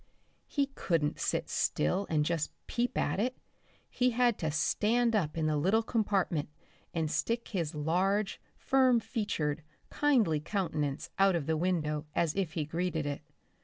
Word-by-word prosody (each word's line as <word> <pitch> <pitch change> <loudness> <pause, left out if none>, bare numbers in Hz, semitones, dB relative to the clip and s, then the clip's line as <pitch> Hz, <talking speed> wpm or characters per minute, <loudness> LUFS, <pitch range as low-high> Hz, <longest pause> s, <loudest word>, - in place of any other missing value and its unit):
He 280 -2 0
couldn't 165 - 0
sit - - -1
still 190 - 0
and 150 -2 +2
just 165 -2 -1
peep 240 0 -1
at 145 - 0
it, 250 +4 0 0.5
he 250 0 +1
had 240 -1 +2
to 160 - -1
stand 225 +9 +2
up 165 -7 0
in 160 - 0
the 155 -1 +1
little 195 +9 +2
compartment 200 -10 0 0.4
and 160 -2 -1
stick 230 +5 -1
his 170 -6 -2
large, 190 +7 0 0.2
firm 260 -3 +4
featured, 160 - -2 0.3
kindly 240 - +3
countenance 155 -5 -2
out 195 -1 +5
of 165 -4 -1
the 160 - +1
window 155 -3 -1
as 165 -3 +1
if 185 -5 -1
he 155 -3 -1
greeted 165 0 -2
it. 145 0 -3
175 Hz, 155 wpm, -31 LUFS, 155-220 Hz, 0.5 s, out